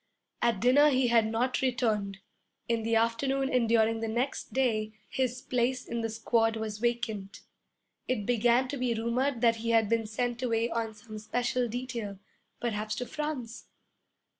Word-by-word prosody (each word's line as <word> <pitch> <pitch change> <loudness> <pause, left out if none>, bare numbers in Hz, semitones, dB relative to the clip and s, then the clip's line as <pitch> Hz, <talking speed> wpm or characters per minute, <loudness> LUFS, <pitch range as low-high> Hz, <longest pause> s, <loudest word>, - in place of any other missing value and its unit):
At 235 -4 +2
dinner 270 +6 +5
he 260 -3 +2
had 230 -2 +4
not 240 +3 0
returned. 220 -6 0 0.5
In 230 -1 +1
the 225 +1 0
afternoon 265 +4 +1
and 240 -3 +2
during 225 0 +3
the 225 - -2
next 240 +5 -2
day 220 -5 0
his 255 -1 -2
place 250 +1 0
in 235 0 -3
the 225 - -2
squad 225 0 +1
was 215 -1 -4
vacant. 230 -4 -2 0.7
It 215 -5 -1
began 240 +2 +3
to 280 - -3
be 250 -2 0
rumored 235 +3 0
that 230 -1 +4
he 230 +1 -3
had 225 -2 +3
been 225 -1 +1
sent 240 +2 -2
away 230 -1 0
on 225 -1 -2
some 215 0 -9
special 245 +3 -1
detail, 235 -4 -5 0.4
perhaps 215 -2 -2
to 250 - -3
France. 290 -6 -5
235 Hz, 165 wpm, -29 LUFS, 225-250 Hz, 0.7 s, dinner